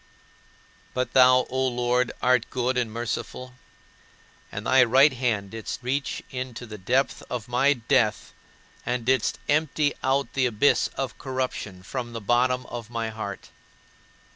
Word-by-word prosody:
But 125 0 -1
thou, 130 -1 +6
O 130 0 +1
Lord, 125 0 +1
art 125 -2 +3
good 130 0 -1
and 120 -3 0
merciful, 120 +2 -4 1.0
and - - -6
thy 130 -1 +6
right 130 +4 +5
hand 115 -6 -1
didst 115 +2 -6
reach 135 +3 -2
into 125 -2 -5
the 105 -2 -9
depth 130 +8 0
of 120 -2 -4
my 135 +4 +3
death 115 -3 0 0.5
and 125 -1 -2
didst 130 -1 +2
empty 150 -1 +1
out 135 +1 0
the 130 -2 +2
abyss 120 +4 +3
of 135 -1 -4
corruption 130 -8 -4
from 120 +3 -5
the 115 - -4
bottom 125 +4 +2
of 120 -2 -7
my 115 -1 -3
heart. 110 -2 -7
125 Hz, 140 wpm, -25 LUFS, 115-130 Hz, 1.0 s, thou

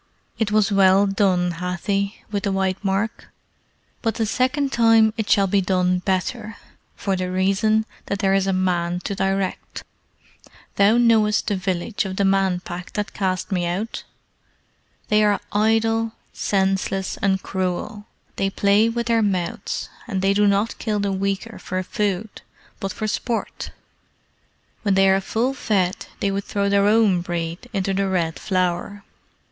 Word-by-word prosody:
It 220 -2 0
was 215 -1 +3
well 195 0 +5
done, 195 -3 +1
Hathi 195 +3 -2
with 205 -1 -1
the 200 - +1
white 190 0 -1
mark; 200 +3 -1 0.7
but 225 -1 -1
the 225 - 0
second 265 +5 0
time 225 -2 +4
it 220 -2 -3
shall 200 - +4
be 195 +1 +2
done 180 -1 +1
better, 205 +4 -2 0.4
for 195 -2 -1
the 185 0 -2
reason 195 +4 +2 0.2
that 200 - -1
there 195 -1 +1
is 195 0 +2
a - - +2
man 180 -2 0
to 200 - -3
direct. 195 -1 -2 0.9
Thou 205 +3 +5
knowest 225 -3 +3
the 205 - 0
village 185 +3 -2
of 190 -1 -4
the 200 - +1
Man 195 -2 +2
Pack 180 0 -8
that 210 0 -3
cast 190 0 -2
me 180 -2 0
out? 195 +6 -3 1.1
They 215 0 +4
are 205 -1 +3
idle, 225 +1 +1 0.2
senseless, 195 -1 -1
and 190 -1 0
cruel; 190 +3 -3 0.3
they 195 - +1
play 200 +3 +3
with 235 +1 -2
their 230 -1 +2
mouths, 185 -5 -2 0.2
and 195 -4 -2
they 195 0 +3
do 205 +1 +3
not 200 +3 +1
kill 215 -2 -1
the 200 -1 0
weaker 195 +3 -3
for 185 0 -3
food, 205 +2 -3 0.4
but 195 -2 -3
for 215 - -4
sport. 225 +2 -3 1.1
When 200 -3 +1
they 195 0 +5
are 195 0 +3
full 235 +7 -1
fed 195 -8 -1
they 200 - +1
would 195 0 -3
throw 200 -1 -1
their 200 0 +3
own 210 -4 +4
breed 170 +5 -4
into 195 -2 -1
the 195 +1 0
Red 170 -4 -1
Flower. 185 +1 -1
195 Hz, 160 wpm, -22 LUFS, 185-215 Hz, 1.1 s, well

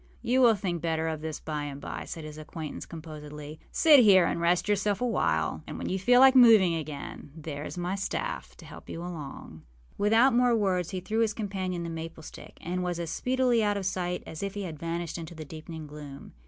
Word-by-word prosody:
â - - -17
âYou 260 +1 +4
will 235 -3 +6
think 180 -4 -3
better 160 -1 0
of 160 -1 -3
this 155 -1 -4
by 150 -2 -4
and 140 -1 -6
by,â - - -6
said 165 - -6
his 155 0 -8
acquaintance, 155 0 -7
composedly. 150 -2 -9
âSit 305 -3 +7
here 195 -6 +7
and 170 - -1
rest 175 +3 +2
yourself 205 0 +1
a 250 - 0
while; 80 - 0
and - - -6
when - - -4
you 190 - -1
feel 245 +6 +5
like 265 0 +8
moving 220 -8 +7
again, 150 -3 -6
there 150 -2 -6
is - - -7
my 175 +1 -2
staff 200 - -4
to - - -13
help - - -12
you - - -5
along.â 150 - -8 0.4
Without 225 +6 +5
more 245 0 +4
words, 185 -5 +1
he 185 -2 -4
threw 215 +5 -2
his 220 -2 +2
companion 190 -4 -3
the - - -4
maple 165 0 -7
stick, - - -11
and 180 +2 -3
was 175 -1 -2
as 165 -1 -3
speedily 250 -1 +1
out 205 -1 +1
of 195 - -4
sight 180 -1 -2
as 160 - -8
if 200 0 -4
he 205 - -3
had 160 -5 -6
vanished 170 +1 -3
into 165 +1 -8
the 155 -1 -7
deepening 160 +1 -8
gloom. 145 -2 -10
175 Hz, 225 wpm, -28 LUFS, 155-205 Hz, 0.4 s, like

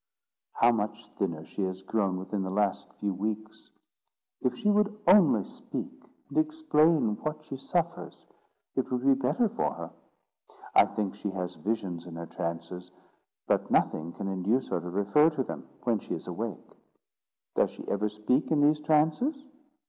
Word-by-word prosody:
"How 120 - +5
much 110 -2 -3
thinner 80 -5 -1
she - - -6
has 95 0 -2
grown 95 -2 0
within 95 +2 -3
the 95 - -2
last 100 0 0
few 100 -2 -2
weeks! 110 +2 -4 0.7
If 125 -1 +1
she 210 +11 +2
would 210 0 +2
only 185 0 +6
speak, - - -6 0.4
and - - +1
explain 170 - +3
what 155 +3 -4
she 135 - -6
suffers, 170 +5 -2 0.5
it 130 - 0
would 125 0 0
be 140 - +7
better 135 - +2
for 225 +3 -1
her. - - -7 0.8
I - - +8
think 105 -3 -2
she 105 0 -4
has 90 -2 -3
visions 90 -1 -3
in 85 - -8
her 85 0 -5
trances, 85 +2 -5 0.6
but - - +1
nothing 80 +2 +1
can 100 - -5
induce 95 +7 0
her 85 - -1
to 90 - -6
refer 100 - +4
to 155 -5 -2
them - - -7
when 115 -3 +2
she - - -4
is - - -8
awake." - - -5 0.8
"Does - - +3
she - - -11
ever 105 +1 0
speak 105 +7 0
in 155 - +3
these 150 +1 +4
trances?" 160 - +2
110 Hz, 165 wpm, -29 LUFS, 95-155 Hz, 0.8 s, I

